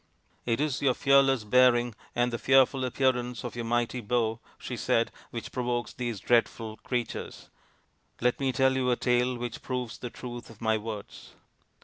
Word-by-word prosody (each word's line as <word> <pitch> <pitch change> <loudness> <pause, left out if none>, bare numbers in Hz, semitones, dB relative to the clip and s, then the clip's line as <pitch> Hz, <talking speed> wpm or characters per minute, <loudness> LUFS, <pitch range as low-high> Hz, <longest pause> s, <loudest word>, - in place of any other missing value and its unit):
" - - -38
It 115 0 +1
is 150 -3 0
your 130 -3 +3
fearless 135 -3 +4
bearing 120 +1 +4 0.2
and 120 0 +1
the 115 - -2
fearful 135 0 +4
appearance 125 -1 0
of - - -5
your 120 -1 -4
mighty 120 +1 0
bow/' 115 0 0 0.2
she - - -6
said, - - +1
" - - -24
which - - -6
provokes 120 -1 -2
these 120 -5 -3
dreadful 115 0 +1
creatures. 120 +2 -4 0.7
Let 125 0 +1
me 135 -1 +1
tell 130 +1 +3
you 130 -1 +1
a 125 - +3
tale 125 +1 +1
which 120 -1 -5
proves 125 -3 -4
the 125 - -5
truth 120 0 -8
of 115 -2 -14
my 110 -1 +2
words. 110 -1 -7
120 Hz, 180 wpm, -28 LUFS, 115-130 Hz, 0.7 s, fearless